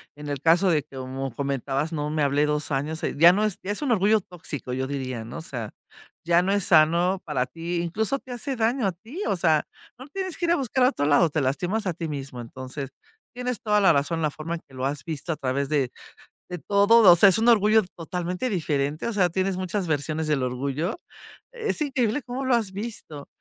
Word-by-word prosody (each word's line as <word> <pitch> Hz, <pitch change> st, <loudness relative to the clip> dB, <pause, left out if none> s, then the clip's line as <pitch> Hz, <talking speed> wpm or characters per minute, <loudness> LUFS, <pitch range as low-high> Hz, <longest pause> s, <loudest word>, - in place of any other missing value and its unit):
en 150 Hz, 0 st, -9 dB
el 140 Hz, -2 st, -3 dB
caso 170 Hz, +5 st, +4 dB
de 155 Hz, -4 st, +2 dB
que, 135 Hz, -1 st, -13 dB
como 130 Hz, 0 st, -5 dB
comentabas, 140 Hz, +2 st, -2 dB
¿no? 150 Hz, -1 st, -2 dB
Me 155 Hz, 0 st, -1 dB
hablé 145 Hz, +1 st, +2 dB
2 150 Hz, 0 st, -1 dB
años, 150 Hz, +4 st, -2 dB, 0.2 s
ya 170 Hz, +3 st, +8 dB
no 210 Hz, +3 st, +1 dB
es 210 Hz, -, -1 dB
ya 200 Hz, -, -2 dB
es 210 Hz, -, -3 dB
un 280 Hz, -, 0 dB
orgullo 215 Hz, 0 st, +4 dB
tóxico, 170 Hz, -9 st, -7 dB
yo 130 Hz, +1 st, -1 dB
diría, 130 Hz, -4 st, -4 dB
¿no? 120 Hz, +8 st, -8 dB
O -, -, -6 dB
sea, 120 Hz, -9 st, -6 dB, 0.5 s
ya 170 Hz, +1 st, +4 dB
no 195 Hz, -, 0 dB
es 200 Hz, -2 st, +1 dB
sano 170 Hz, +3 st, +4 dB
para 135 Hz, -5 st, 0 dB
ti, 170 Hz, +5 st, -5 dB
incluso, 220 Hz, +10 st, -1 dB
te 260 Hz, -, -13 dB
hace 265 Hz, +3 st, -3 dB
daño 230 Hz, 0 st, +1 dB
a -, -, +1 dB
ti, 230 Hz, -, -9 dB
o 195 Hz, -, +1 dB
sea, 160 Hz, -3 st, +2 dB, 0.3 s
no 260 Hz, +3 st, -11 dB
tienes 375 Hz, +2 st, -5 dB
que 345 Hz, -, -1 dB
ir 340 Hz, -, +2 dB
a -, -, +5 dB
buscar 260 Hz, -1 st, 0 dB
a -, -, +6 dB
otro 145 Hz, -, -2 dB
lado, 150 Hz, +3 st, +4 dB
te 150 Hz, 0 st, -1 dB
lastimas 180 Hz, +11 st, -1 dB
a 175 Hz, -, 0 dB
ti 165 Hz, 0 st, -5 dB
mismo. 135 Hz, -4 st, -6 dB
Entonces 130 Hz, +3 st, -7 dB, 0.4 s
tienes 250 Hz, -1 st, -3 dB
toda 210 Hz, -3 st, +2 dB
la 190 Hz, -4 st, +5 dB
razón, 155 Hz, +3 st, 0 dB
la 150 Hz, -, +1 dB
forma 160 Hz, +3 st, -5 dB
en 165 Hz, -, -8 dB
que 135 Hz, -, -21 dB
lo 130 Hz, 0 st, -3 dB
has 145 Hz, 0 st, -4 dB
visto 160 Hz, +1 st, -4 dB
a -, -, -1 dB
través 135 Hz, +1 st, -2 dB
de, 140 Hz, -5 st, +1 dB, 0.6 s
de 180 Hz, -, -4 dB
todo, 200 Hz, +3 st, +5 dB
o 175 Hz, -, +8 dB
sea, 195 Hz, +3 st, +7 dB
es 190 Hz, -, +2 dB
un 230 Hz, +2 st, +2 dB
orgullo 215 Hz, -1 st, +5 dB
totalmente 180 Hz, +7 st, -3 dB
diferente, 150 Hz, -4 st, -1 dB
o 230 Hz, -, -3 dB
sea, 180 Hz, -4 st, +2 dB
tienes 190 Hz, +1 st, -1 dB
muchas 185 Hz, 0 st, -2 dB
versiones 155 Hz, +1 st, -1 dB
del 150 Hz, -4 st, +1 dB
orgullo. 140 Hz, -, -2 dB, 0.5 s
Es 450 Hz, -9 st, -3 dB
increíble 260 Hz, -2 st, 0 dB
cómo 255 Hz, +3 st, -4 dB
lo 260 Hz, -2 st, +3 dB
has 215 Hz, -5 st, -1 dB
visto. 195 Hz, -8 st, -7 dB
170 Hz, 230 wpm, -25 LUFS, 145-210 Hz, 0.6 s, ya